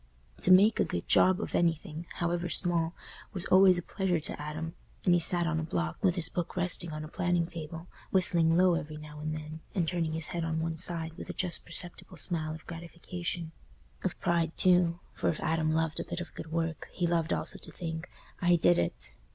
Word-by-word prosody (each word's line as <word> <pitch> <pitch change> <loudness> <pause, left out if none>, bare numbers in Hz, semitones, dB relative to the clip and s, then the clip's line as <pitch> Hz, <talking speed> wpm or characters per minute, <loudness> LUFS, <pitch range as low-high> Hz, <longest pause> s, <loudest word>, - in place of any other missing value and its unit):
To - - +4
"make 200 +4 +7
a - - +5
good 85 - -4
job" 185 -1 +5
of - - -4
anything, 165 0 0
however 175 0 -1
small, 170 0 0 0.4
was 185 -2 -3
always 185 -1 +6
a 175 - -3
pleasure 190 -3 0
to 150 - -4
Adam, 155 +2 -5 0.3
and 180 - +5
he 175 - +5
sat 175 +1 +3
on 165 -1 0
a - - -2
block, 85 - -3
with 185 -2 +3
his 170 -4 +1
book 175 0 -4
resting 175 -2 +3
on 155 0 -5
a - - -6
planing 175 0 0
table, 165 0 -6 0.2
whistling 170 -3 +4
low 185 0 +5
every 155 -2 -3
now 150 0 -10
and 155 +1 -3
then 155 +1 -8 0.2
and 175 -4 +1
turning 165 -2 -1
his 160 -1 +2
head 170 -1 -2
on 160 -1 -1
one 165 0 -1
side 165 -1 -2
with - - -8
a - - -3
just 180 -3 -2
perceptible 175 +1 -1
smile 155 -1 +1
of 160 - -13
gratification—of 170 - -7
pride, 170 -2 0
too, 175 -2 +4
for - - 0
if 160 - -2
Adam 160 -1 +1
loved 160 0 0
a - - -1
bit - - -5
of 175 - -7
good 160 - -8
work, 165 -2 -2
he 175 - -1
loved 170 -1 +1
also - - -2
to - - -9
think, 165 -1 -5 0.3
"I 175 0 +5
did 90 - +4
it!" 85 - -2
165 Hz, 210 wpm, -30 LUFS, 160-175 Hz, 0.4 s, make